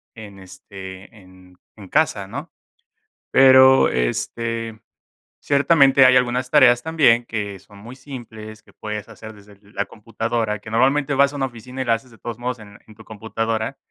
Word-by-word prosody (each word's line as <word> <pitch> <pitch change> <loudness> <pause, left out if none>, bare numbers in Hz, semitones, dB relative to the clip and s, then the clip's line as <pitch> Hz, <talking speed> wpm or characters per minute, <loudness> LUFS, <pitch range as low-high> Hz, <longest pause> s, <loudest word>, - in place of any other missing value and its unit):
en, 105 -3 -12
este, 95 +2 -12
en 95 -2 -19 0.2
en 100 -3 -13
casa, 150 -10 0
¿no?, - - -8 0.8
pero, 130 0 +6
este, 115 - -3 0.6
ciertamente 140 -2 +4
hay 130 - +5
algunas 125 0 0
tareas 130 -5 +5
también 135 -8 +2
que 105 -3 -5
son 100 +2 -20
muy 120 +5 -12
simples, 110 -5 -11
que - - -23
puedes 105 0 -7
hacer 110 0 -11
desde 100 -1 -18
la 100 - -2
computadora, 110 +1 -4
que 110 +2 -12
normalmente 135 +5 +1
vas 140 +1 +2
a - - -5
una 135 - -2
oficina 125 +2 -8
y - - -4
la 115 - +1
haces 115 +3 -8
de 115 - -18
todos 120 0 -8
modos 125 0 -4
en 100 -1 -14
en 110 - -16
tu 110 +1 -16
computadora, 110 +3 -4
115 Hz, 170 wpm, -20 LUFS, 105-130 Hz, 0.8 s, pero